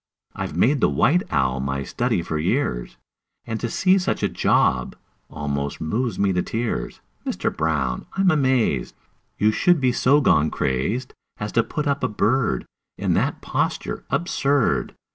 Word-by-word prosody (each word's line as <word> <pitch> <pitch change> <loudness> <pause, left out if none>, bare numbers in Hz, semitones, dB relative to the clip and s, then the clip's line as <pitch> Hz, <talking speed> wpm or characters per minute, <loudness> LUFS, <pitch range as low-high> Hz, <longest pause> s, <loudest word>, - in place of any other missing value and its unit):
I've - - -5
made 140 +3 +3
the - - +4
white 175 +5 +3
owl 65 -3 +1
my 70 +1 -2
study 85 - -1
for 80 -2 -3
years, 75 - -1 0.5
And 115 -1 -3
to 120 - -2
see 185 +9 +3
such 180 - -1
a - - +2
job - - +1 0.3
almost 70 -1 -3
moves 110 +6 -2
me 100 -1 +2
to 90 - +1
tears! 115 - -3 0.2
Mister - - -2
Brown, 70 -6 -1
I'm 195 -1 +3
amazed 130 - +1 0.4
You 105 +1 +3
should 175 +8 +3
be 130 -2 +2
so 135 +4 +3
gone 80 - +3
crazed 90 - -2 0.2
As 105 0 -4
to 115 - +3
put 150 +6 -4
up 140 -1 0
a - - +3
bird 105 - 0 0.3
In - - 0
that - - 0
posture - - -2
absurd! 140 -6 +1
110 Hz, 160 wpm, -23 LUFS, -, 0.5 s, the